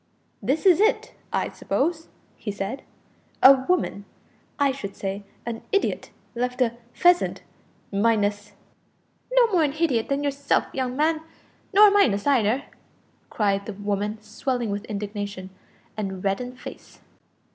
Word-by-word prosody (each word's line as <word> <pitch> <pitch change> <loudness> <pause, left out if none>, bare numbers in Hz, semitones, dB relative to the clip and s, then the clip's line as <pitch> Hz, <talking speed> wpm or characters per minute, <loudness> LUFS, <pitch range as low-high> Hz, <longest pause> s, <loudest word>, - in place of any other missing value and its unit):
"This 270 - 0
is 365 -3 +6
it, 435 +2 +2 0.2
I - - 0
suppose," 325 -1 -1 0.3
he 210 - -5
said. 200 +6 -4 0.6
"`A 265 +1 +7
woman 335 - 0 0.5
I 280 -1 +3
should 205 -7 -6
say 195 +1 -4 0.2
an 230 -1 -4
idiot 400 - 0 0.2
left 250 +1 -2
a 240 -3 +2 0.2
pheasant, 355 +4 +3 0.5
minus' 205 -1 +1 0.4
" - - -42
"No - - +4
more 350 -4 +4
a - - +3
hidyot 275 -6 0
than 280 +1 0
yourself, 280 0 +1
young 255 -1 -2
man, 310 +1 +2 0.5
nor 415 +1 +8
a - - -1
minus 240 - +3
neither," 255 -1 +2 0.7
cried 200 -2 0
the 215 - -4
woman, 205 +1 -2
swelling 235 +1 -2
with 205 +2 -4
indignation, 205 -2 -5 0.4
and 195 -3 -4
red 195 +3 0
in 250 - -5
the 250 - -13
face. - - -11
240 Hz, 145 wpm, -24 LUFS, 205-285 Hz, 0.7 s, nor